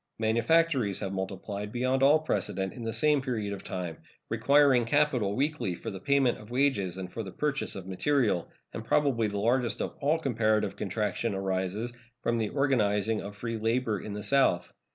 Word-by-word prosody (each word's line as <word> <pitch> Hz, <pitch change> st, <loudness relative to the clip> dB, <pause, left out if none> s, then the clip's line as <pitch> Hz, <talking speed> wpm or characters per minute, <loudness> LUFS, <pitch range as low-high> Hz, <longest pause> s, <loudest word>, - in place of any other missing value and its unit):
Manufactories 115 Hz, -, +2 dB
have 95 Hz, -2 st, -4 dB
multiplied 100 Hz, +2 st, -4 dB
beyond 130 Hz, +2 st, 0 dB
all 140 Hz, +3 st, +6 dB
precedent 95 Hz, -, -2 dB
in 120 Hz, -, -9 dB
the 115 Hz, -, -2 dB
same 150 Hz, +2 st, +3 dB
period 110 Hz, -6 st, -2 dB
of 100 Hz, -, -7 dB
time, 90 Hz, -3 st, -5 dB, 0.3 s
requiring 130 Hz, +3 st, +4 dB
capital 125 Hz, -5 st, +1 dB
weekly 130 Hz, -, -1 dB
for -, -, -6 dB
the 95 Hz, -, -7 dB
payment 135 Hz, +3 st, +2 dB
of 105 Hz, 0 st, -13 dB
wages 120 Hz, -9 st, +1 dB
and 90 Hz, -1 st, -6 dB
for 115 Hz, -, -3 dB
the 100 Hz, -, -6 dB
purchase 150 Hz, +4 st, -2 dB
of 95 Hz, -, -7 dB
material; 105 Hz, -, +1 dB, 0.2 s
and -, -, -5 dB
probably 130 Hz, -7 st, +2 dB
the 100 Hz, 0 st, -4 dB
largest 120 Hz, +3 st, +1 dB
of -, -, -3 dB
all 150 Hz, +3 st, +3 dB
comparative 115 Hz, -7 st, +1 dB
contraction 105 Hz, +2 st, -2 dB
arises 95 Hz, +4 st, -2 dB, 0.3 s
from 115 Hz, -, +1 dB
the 110 Hz, -2 st, -1 dB
organizing 110 Hz, -6 st, +1 dB
of 100 Hz, 0 st, -8 dB
free 115 Hz, +2 st, -4 dB
labor 115 Hz, -2 st, 0 dB
in 105 Hz, -, -6 dB
the 105 Hz, 0 st, -5 dB
South. 135 Hz, -10 st, +2 dB
115 Hz, 175 wpm, -29 LUFS, 100-135 Hz, 0.3 s, all